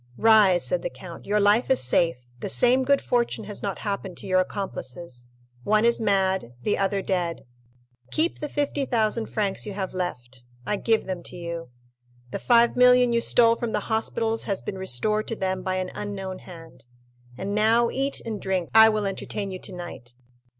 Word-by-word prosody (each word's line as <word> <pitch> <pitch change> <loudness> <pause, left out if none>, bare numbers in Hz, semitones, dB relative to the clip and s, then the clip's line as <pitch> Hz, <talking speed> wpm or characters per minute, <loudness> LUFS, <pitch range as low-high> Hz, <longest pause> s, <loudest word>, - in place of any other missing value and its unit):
"Rise," 215 -5 +5
said - - -1
the - - -3
count, - - -11
"your 210 +1 +2
life 205 +4 +3
is 265 - +4
safe; 165 +6 +2 0.2
the - - -4
same 245 - +3
good 280 +1 +2
fortune 235 -2 0
has 205 0 -6
not 200 -2 -3
happened 200 -3 -4
to - - -5
your 185 -1 +2
accomplices—one 125 - -3
is 235 0 +3
mad, 190 - +1
the 210 - +1
other 195 0 -1
dead. 175 -5 -2 0.7
Keep 325 +2 0
the 295 - -4
50,000 240 -7 0
francs 205 -1 -2
you 205 - -4
have 190 -2 -4
left—I 125 -3 -5
give 225 +2 +1
them 185 -2 -4
to 175 - -10
you. 170 -2 -6 0.6
The - - -3
5,000,000 250 +1 +5
you 235 - +2
stole 230 -1 +4
from 230 -1 -4
the - - 0
hospitals 225 0 0
has 200 -3 -2
been 190 - -5
restored 210 - -1
to 225 - -3
them 190 -2 -2
by 185 0 -2
an 185 -1 -3
unknown 195 -2 -5
hand. 165 -7 -13 0.5
And 200 +7 -4
now 225 +3 +3
eat 275 +1 -1
and 220 -3 -4
drink; 185 -3 -2
I 220 0 +8
will 215 -1 -1
entertain 195 0 -4
you 185 - -6
tonight. 175 -11 -8
200 Hz, 175 wpm, -25 LUFS, 180-225 Hz, 0.7 s, I